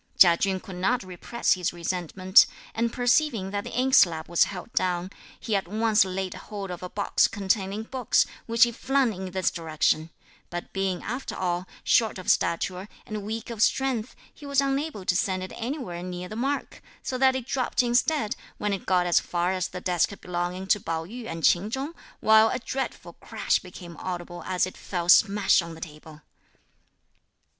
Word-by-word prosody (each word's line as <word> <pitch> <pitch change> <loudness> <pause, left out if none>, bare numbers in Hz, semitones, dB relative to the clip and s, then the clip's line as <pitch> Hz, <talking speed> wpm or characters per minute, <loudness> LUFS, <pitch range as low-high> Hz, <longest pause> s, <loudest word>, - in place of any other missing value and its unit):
Chia 175 -2 +8
Chün 190 +1 0
could 185 -1 -9
not 235 +7 +1
repress 185 +6 0
his 180 -2 -1
resentment; 180 +2 +3 0.3
and 230 +1 0
perceiving 245 -5 +1
that 205 0 -2
the - - -7
inkslab 175 -11 +4
was 170 - +4
held 195 +3 -8
down, 180 0 0 0.3
he 220 - -1
at 195 -3 -1
once 215 +2 +3
laid 190 0 -3
hold 200 -3 -7
of 175 - -6
a 180 - -6
box 200 +2 +2
containing 200 0 -1
books, 255 +1 +1 0.2
which 230 +1 +5
he 240 - +4
flung 265 0 +1
in 190 0 -6
this 185 0 0
direction; 160 -1 0 0.4
but 175 0 -6
being, 195 -2 -1
after 255 +2 -4
all, 180 0 -2 0.2
short 225 -4 +3
of 185 - +1
stature, 185 +4 -1 0.2
and 215 -1 -5
weak 220 +3 -5
of 225 -2 -5
strength, 255 -1 +1 0.2
he - - -17
was 280 -1 +1
unable 275 -6 -1
to 180 - +2
send 185 0 0
it 185 - -7
anywhere 230 - -4
near 180 0 -5
the 215 - -8
mark; 275 +5 -2 0.2
so 260 - -3
that 260 0 +4
it 260 -3 -3
dropped 255 -1 0
instead 240 -1 +1 0.2
when 210 -1 -1
it 195 - -5
got 180 -1 +3
as 175 - +4
far 175 +1 -1
as 185 -1 -1
the 180 - -7
desk 180 +2 0
belonging 180 +1 -3
to 210 +2 +3
Pao 165 -3 -3
yü 230 +5 -8
and 165 -1 -6
Ch'in 185 +4 +4
Chung, 270 +7 -3 0.3
while 220 0 +6
a - - -1
dreadful 240 -8 -5
crash 220 +4 -1
became 175 -2 -11
audible 175 -1 -5
as 185 -1 +1
it 185 - -8
fell 175 -3 -4
smash 200 0 +5
on 170 -1 -8
the 160 - -13
table. 155 0 -10
195 Hz, 185 wpm, -26 LUFS, 180-230 Hz, 0.4 s, Chia